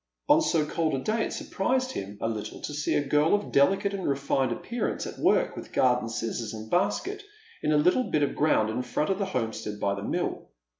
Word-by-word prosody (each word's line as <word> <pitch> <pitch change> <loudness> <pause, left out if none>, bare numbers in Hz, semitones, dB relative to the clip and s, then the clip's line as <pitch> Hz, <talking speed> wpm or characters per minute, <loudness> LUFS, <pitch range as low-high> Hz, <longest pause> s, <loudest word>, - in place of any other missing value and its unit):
On 295 +2 +7
^o 165 - +1
cold 160 -2 0
a - - -1
day 220 +1 +1
it - - -5
surprised 255 +6 -1
him 100 +1 -6
a - - 0
little 110 -2 -4
to 150 - -5
see 145 +1 0
a 145 - 0
girl 150 +6 +4
of 205 - -3
delicate 195 +8 +3
and 195 -2 -3
/efined 135 -2 +1
appearance 235 - -3
at - - -7
work - - +2
with - - -9
garden 125 -2 +2
scissors 115 0 -3
and 110 0 -9
basket 205 - 0 0.4
in - - 0
the 150 - +4
little 180 +12 +3
bit 150 - +1
of 140 - 0
ground 110 -8 +2
in 120 - -1
front 140 +7 -1
of 190 - -1
the 200 - +1
homestead 110 - -3
by 100 - +1
the 100 - -5
mill. - - -3
150 Hz, 220 wpm, -27 LUFS, -, 0.4 s, On